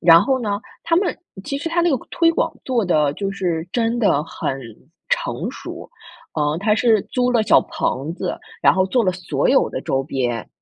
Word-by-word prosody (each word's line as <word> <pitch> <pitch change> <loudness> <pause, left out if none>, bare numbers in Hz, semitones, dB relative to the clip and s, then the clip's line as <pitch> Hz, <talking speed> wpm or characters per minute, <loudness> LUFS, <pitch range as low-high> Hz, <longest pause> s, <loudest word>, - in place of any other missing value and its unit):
然 165 0 +7
后 265 -1 +1
呢， 205 -2 -2 0.2
他 335 - +2
们 370 0 +1 0.3
其 275 - -3
实 310 - -3
它 335 +1 +1
那 345 0 +3
个 270 - +3
个 - - -16
推 335 -1 +3
广 330 0 0
做 245 -5 +1
得 150 -5 +2
就 195 +3 -3
是 175 -4 -2
真 235 0 0
的 175 -10 +3
很 135 -4 -4 0.5
成 - - -1
熟。 - - -9 0.5
嗯， 150 +1 +1
它 210 +1 +2
是 220 -3 +3
租 250 0 +1
了 230 - +3
小 215 - +5
棚 145 +6 -3
子， - - -4 0.2
然 - - +6
后 190 0 +2
做 245 +4 +2
了 185 - +3
所 185 0 -1
有 - - +4
的 - - -4
周 135 0 -1
边， 125 -5 -2
205 Hz, 220 characters per minute, -21 LUFS, 160-255 Hz, 0.5 s, 然